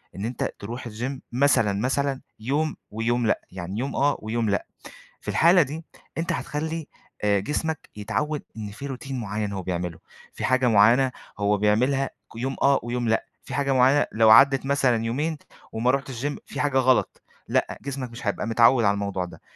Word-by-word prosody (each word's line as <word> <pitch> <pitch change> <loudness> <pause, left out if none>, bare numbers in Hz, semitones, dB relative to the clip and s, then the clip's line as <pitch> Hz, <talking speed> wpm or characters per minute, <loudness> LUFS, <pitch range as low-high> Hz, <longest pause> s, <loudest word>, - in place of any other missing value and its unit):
إن 95 - -4
أنت 120 +2 -2
تروُح 120 +4 -6
الGym 125 +5 -4
مثلًا، 120 -5 +3
مثلًا، 135 +1 0 0.2
يوم 145 +7 -1 0.2
ويوم 115 +3 0
لأ، - - +1
يعني 95 +3 -5
يوم 135 +3 -3
آه، 145 +1 +2
ويوم 110 0 -1
لأ، 100 - 0 0.6
في - - -19
الحالة 175 +2 +5
دي 155 +3 -3 0.3
أنت 165 +1 -1
هتخلي، 160 +1 -3 0.4
آآ، 100 -1 +3
جسمَك 155 +8 -3
يتعود 110 +9 -2
إن 105 -2 -5
في 140 +7 -7
Routine 135 +1 -7
معيَّن 105 -4 -3
هو 95 -1 -4
بيعمله، 90 -2 -3 0.3
في - - -3
حاجة 130 -1 +3
معيَّنة 120 +4 +5 0.3
هو 100 0 +2
بيعملها 125 +7 +2 0.3
ك - - -17
يوم 130 +3 -3
آه 140 0 +4
ويوم 120 -1 -2
لأ، 110 - +1 0.2
في - - -9
حاجة 140 -1 0
معيَّنة 130 +3 +4
لو 110 0 +4
عدّت 135 +4 +7
مثلًا 135 -5 +2
يومين 150 +7 -1 0.3
وما 115 +3 +2
رُحتش 135 -2 -3
Gym 145 - -1
في - - -7
حاجة 145 -2 +1
غلط، 130 -1 +2 0.3
لأ، - - 0
جسمك 135 -3 -5
مش 115 -1 -8
هيبقى 100 +2 -1
متعود 115 +1 +5
على 100 0 +4
الموضوع 100 -2 -2
ده، 90 - -12
125 Hz, 180 wpm, -25 LUFS, 110-140 Hz, 0.6 s, عدّت